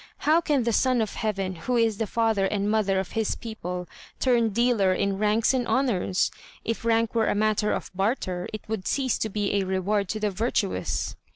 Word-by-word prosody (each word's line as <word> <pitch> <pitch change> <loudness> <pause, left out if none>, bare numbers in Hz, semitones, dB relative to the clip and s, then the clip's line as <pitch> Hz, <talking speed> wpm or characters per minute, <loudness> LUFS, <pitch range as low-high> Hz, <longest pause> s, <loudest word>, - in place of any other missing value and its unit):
How 315 +3 +5
can 290 -6 +1
the 235 0 0
Son 255 +2 +3
of 220 -3 -1
Heaven, 195 -3 -2
who 210 +9 -2
is 225 -3 +2
the 225 - 0
father 220 -3 +1
and 205 +1 -1
mother 200 -3 +2
of 190 - -4
his 220 -2 -1
people, 180 -6 -6 0.3
turn 240 -3 +3
dealer 215 -4 +2
in 200 0 -1
ranks 215 +4 +2
and 250 -2 0
honours? 220 -8 +1 0.3
If 230 0 -2
rank 230 0 +2
were 225 -1 +2
a - - +1
matter 215 0 +1
of - - -3
barter, 190 -2 -1
it 215 - -6
would 215 -4 -3
cease 265 -3 0
to 220 - -1
be 205 -1 -1
a 200 -1 +2
reward 190 +1 0
to 215 - -2
the 210 -1 0
virtuous." 220 +6 -1
215 Hz, 200 wpm, -26 LUFS, 195-230 Hz, 0.3 s, How